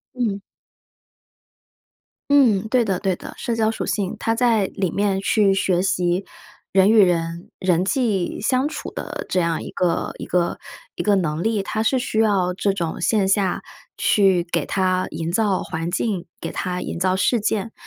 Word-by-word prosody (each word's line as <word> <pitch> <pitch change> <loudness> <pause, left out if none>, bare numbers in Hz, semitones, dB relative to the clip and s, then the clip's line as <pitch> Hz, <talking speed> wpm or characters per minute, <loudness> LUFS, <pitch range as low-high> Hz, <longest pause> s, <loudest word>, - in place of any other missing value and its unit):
嗯。 215 -5 -1 1.9
嗯， 225 -8 +4
对 245 -2 +3
的 190 -3 -1
对 190 -3 0
的， - - -9
社 235 - -2
交 220 -1 +2
属 225 - -3
性。 195 -3 -2
他 225 - 0
在 230 -4 +2
里 190 -3 -2
面 200 -1 0
去 200 0 +3
学 185 -2 +1
习 180 0 0 0.5
人 195 +1 +5
与 220 -1 +6
人 170 -1 -1
人 180 -1 +2
际 205 -5 0
相 255 +5 +1
处 - - -6
的 - - -6
这 180 - +1
样 165 -1 -1
一 - - -7
个 175 -2 -1
一 - - -6
个 175 -1 0 0.4
一 - - -3
个 205 -1 +3
能 165 -3 -1
力， 220 -2 +1
它 220 +3 -2
是 255 +3 +2
需 235 -3 -2
要 195 -5 +2
这 200 +2 0
种 170 -2 -3
线 195 +1 +2
下 195 -1 +1 0.4
去 190 -4 +3
给 - - +1
它 185 -1 0
营 165 0 -4
造 205 -3 +1
环 165 0 -4
境、 190 -3 -1
给 165 - -4
它 180 -1 -3
营 - - -5
造 185 +1 +1
事 230 +3 +2
件， 220 +1 -1
195 Hz, 190 characters per minute, -22 LUFS, 180-220 Hz, 1.9 s, 与